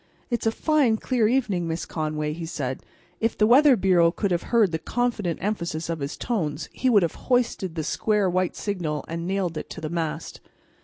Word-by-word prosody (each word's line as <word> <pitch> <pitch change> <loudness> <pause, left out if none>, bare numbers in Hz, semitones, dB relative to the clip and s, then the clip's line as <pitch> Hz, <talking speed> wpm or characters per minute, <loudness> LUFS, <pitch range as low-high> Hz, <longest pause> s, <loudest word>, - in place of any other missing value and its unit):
"It's 235 -1 0
a - - +4
fine, 275 -4 +2
clear 235 -2 +1
evening, 210 -8 0
Miss 165 +1 -3
Conway," 155 -1 -2
he 165 +1 -6
said; 135 -5 -3
and - - -25 0.3
if 225 0 0
the 215 - +4
Weather 265 +4 +7
Bureau 180 -3 +4
could 200 +2 -2
have 175 -1 +1
heard 225 -6 +4
the 160 - -2
confident 225 -8 -1
emphasis 170 -6 -2
of 165 - -3
his 140 +2 -4
tones 165 -10 -2
it 260 - +1
would 205 -6 +5
have 165 - 0 0.2
hoisted 235 -8 +1
the 160 - -2
square 210 +4 +1
white 185 0 0
signal, 165 -8 -3
and 170 +1 -4
nailed 185 -4 -1
it - - -9
to - - -7
the 155 -1 -4
mast. 165 -2 -4
185 Hz, 205 wpm, -25 LUFS, 165-225 Hz, 0.3 s, Weather